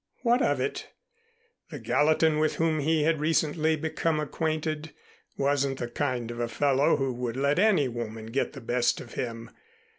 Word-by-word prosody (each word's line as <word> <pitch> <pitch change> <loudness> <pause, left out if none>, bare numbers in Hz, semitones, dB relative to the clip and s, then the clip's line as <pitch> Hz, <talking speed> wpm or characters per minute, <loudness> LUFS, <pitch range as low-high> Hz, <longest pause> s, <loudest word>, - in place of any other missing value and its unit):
What 240 +1 +3
of - - +1
it? - - -3 0.8
The - - -7
Gallatin 155 +1 +2
with 155 0 +1
whom 160 -1 +1
he 155 +1 +2
had 160 0 +2
recently 155 0 +1
become 160 0 -1
acquainted 155 0 -2 0.4
wasn't 140 -1 +1
the 120 - -4
kind 125 -3 -2
of 120 - -7
a 120 - 0
fellow 140 +3 +2
who 135 -2 -1
would 120 0 -4
let 140 +4 +1
any 185 -9 +4
woman 115 -2 -6
get 135 - -1
the 135 - -9
best 120 +1 +1
of 120 - -10
him. 115 -2 -5
145 Hz, 170 wpm, -27 LUFS, 125-155 Hz, 0.8 s, any